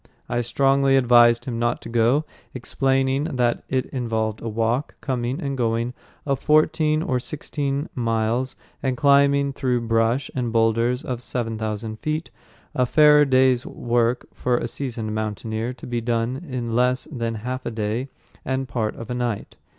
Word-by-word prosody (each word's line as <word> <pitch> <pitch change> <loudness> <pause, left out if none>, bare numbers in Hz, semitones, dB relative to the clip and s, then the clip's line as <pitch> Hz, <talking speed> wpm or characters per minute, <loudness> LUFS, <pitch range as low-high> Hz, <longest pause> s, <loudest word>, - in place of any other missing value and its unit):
I 120 0 0
strongly 135 +2 +3
advised 120 -2 +5
him 120 -3 -3
not 120 0 0
to - - -7
go, 120 +6 +2 0.3
explaining 135 +2 0
that 120 -1 +1
it 130 -1 0
involved 110 -4 -2
a 115 - -4
walk, 115 +5 -1
coming 125 -1 -2
and 140 -1 -3
going, 115 0 0 0.3
of 140 -2 0
fourteen 155 0 +3
or 130 -5 0
sixteen 140 +1 -3
miles, 115 +1 -1 0.3
and 130 -1 0
a - - -5
climb 140 +1 +4
through 125 -3 0
brush 115 +4 +1
and 125 -3 -2
boulders 115 +2 +2
of 125 -2 -4
seven 120 -2 -3
thousand 110 0 -4
feet, 155 +2 -3 0.4
a 125 -1 +1
fair 150 +1 +6
day's 130 -2 +3
work 120 0 0
for 125 -1 0
a 120 - -2
seasoned 115 -4 -4
mountaineer 110 +2 -3
to - - -11
be 120 -1 -2
done 120 +6 -2
in 120 -3 -3
less 125 +1 +1
than 115 -4 -2
half 130 +1 -3
a - - 0
day 110 +4 -2 0.3
and 130 0 -2
part 115 -3 -2
of 115 +2 -7
a - - 0
night. 120 -4 -3
125 Hz, 165 wpm, -23 LUFS, 115-135 Hz, 0.4 s, fair